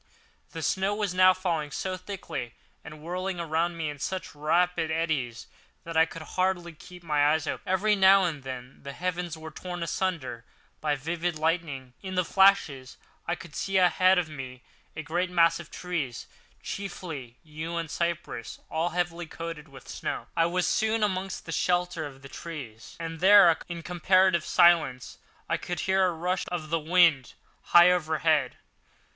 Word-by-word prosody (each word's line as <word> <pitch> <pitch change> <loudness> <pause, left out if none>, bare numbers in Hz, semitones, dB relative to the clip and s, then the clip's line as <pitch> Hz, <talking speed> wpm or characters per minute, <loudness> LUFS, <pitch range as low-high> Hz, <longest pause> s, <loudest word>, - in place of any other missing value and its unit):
The 165 -2 -7
snow 190 +6 0
was 205 -3 -1
now 185 0 +7
falling 170 -5 -2
so 185 +4 -3
thickly 165 - -6 0.3
and 150 0 -11
whirling 180 +2 -3
around 170 +1 -1
me 160 -2 -2
in 145 -1 -6
such 185 +6 -4
rapid 165 +2 +1
eddies 155 -8 -2 0.4
that 165 0 -7
I 160 +1 +5
could 165 0 -9
hardly 175 0 -1
keep 180 +3 -14
my 150 -2 +3
eyes 160 0 0
open. - - -5
Every 210 +3 +3
now 195 0 +6
and 160 -5 -2
then 130 0 -8
the 140 0 -7
heavens 175 0 -3
were 160 0 -9
torn 175 +2 -6
asunder 155 -10 -2 0.4
by 150 -1 0
vivid 165 +3 -3
lightning, 155 -5 -2
and 190 - -7
in 185 - -5
the 180 -1 +1
flashes 165 -10 +3 0.3
I 175 - 0
could 175 -3 -12
see 195 0 -1
ahead 185 +1 +4
of 180 -2 +1
me 130 -4 -8 0.3
a 155 - -5
great 175 +4 -1
mass 170 -1 +3
of 170 - -10
trees, 155 -10 -4 0.4
chiefly 160 -11 -6
yew 160 +2 -6
and 165 -2 -4
cypress 170 -8 -3
all 165 +2 0
heavily 175 0 -2
coated 165 -1 -7
with 140 -2 -14
snow. - - -4
I 165 0 +3
was 180 +1 0
soon 220 0 +1
amongst 190 -1 -2
the 165 - -6
shelter 175 -2 0
of 135 -1 -14
the - - -9
trees, 135 -8 -9
and 165 -1 -5
there, 190 -2 +7
in 170 -1 -6
comparative 180 0 +3
silence, 150 -8 +3 0.3
I - - 0
could 175 -2 -4
hear 190 0 +3
the 180 - -1
rush 180 +3 -2
of 165 -3 -5
the 165 - +2
wind 160 -5 +3 0.3
high 175 +1 +7
overhead. 155 -5 +1
170 Hz, 170 wpm, -27 LUFS, 155-180 Hz, 0.4 s, now